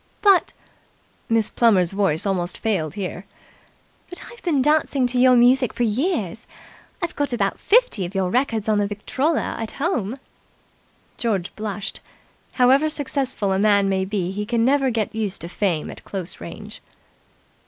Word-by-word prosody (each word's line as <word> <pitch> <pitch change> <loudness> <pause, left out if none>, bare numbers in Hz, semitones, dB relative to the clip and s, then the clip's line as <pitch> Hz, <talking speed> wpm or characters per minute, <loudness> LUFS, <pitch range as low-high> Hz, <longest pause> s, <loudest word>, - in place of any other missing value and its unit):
"But 395 -4 +4 0.4
" - - -38
Miss 225 -2 +2
Plummer's 195 -7 +3
voice 195 -3 0
almost 180 -2 -1
failed 175 -9 -1
here 185 -1 -5 0.8
"But 360 - -8
I've 475 - -14
been 320 -6 +1
dancing 290 -1 +2
to 245 0 +1
your 255 0 +6
music 245 +1 +4
for 245 - -1
years! 230 - -1 0.6
I've 340 - -2
got 285 -3 -1
about 240 - -1
fifty 470 - +3
of 180 +3 -6
your 185 -2 0
records 230 -5 0
on 215 -1 +2
the 205 - +1
Victrola 260 +10 -1
at 225 -1 -4
home." 270 - -2 1.0
George 200 -6 -2
blushed. 210 -1 -5 0.5
However 270 +4 +4
successful 265 -9 -1
a 190 - 0
man 200 -1 +3
may 190 -1 0
be 190 -2 -2
he 205 +2 -3
can 230 +1 0
never 270 0 +3
get 225 -4 -2
used 210 -3 -1
to 170 - -4
Fame 175 -3 -2
at - - -12
close 190 -2 -6
range. - - -9
220 Hz, 160 wpm, -22 LUFS, 195-265 Hz, 1.0 s, your